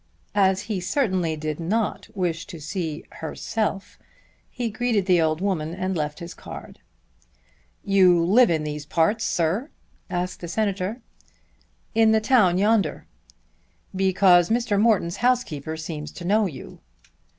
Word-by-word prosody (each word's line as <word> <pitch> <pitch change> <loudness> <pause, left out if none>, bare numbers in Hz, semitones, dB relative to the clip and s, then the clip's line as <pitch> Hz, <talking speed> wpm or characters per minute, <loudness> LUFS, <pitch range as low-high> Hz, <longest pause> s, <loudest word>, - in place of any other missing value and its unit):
As 190 -2 +3
he 210 -3 -3
certainly 185 - 0
did 155 0 -4
not 200 +3 -1
wish 170 -3 -2
to 165 - -9
see 160 -1 -4 0.2
"herself," 195 +5 -3 0.5
he 240 -3 -3
greeted 220 -3 0
the 180 -3 +4
old 155 +1 0
woman 170 -5 -1
and 185 0 -2
left 150 -2 -2
his 170 0 -8
card. - - -10 1.1
"You 185 -4 +4
live 235 +7 +5
in 160 -2 0
these 150 -1 -4
parts, 205 +9 +1
sir?" 180 - 0 0.4
asked 180 +1 -3
the 170 - -6
Senator. 200 +3 -2 0.9
"In 225 -1 +4
the 220 - +4
town 215 -6 +3
yonder." 210 +2 +1 0.9
"Because 185 -2 +4
Mr. 225 -3 +1
Morton's 205 -7 +2
housekeeper 195 - 0
seems 155 -2 -6
to 175 - -8
know 210 +3 +3
you." 135 -7 -10
185 Hz, 135 wpm, -24 LUFS, 165-215 Hz, 1.1 s, live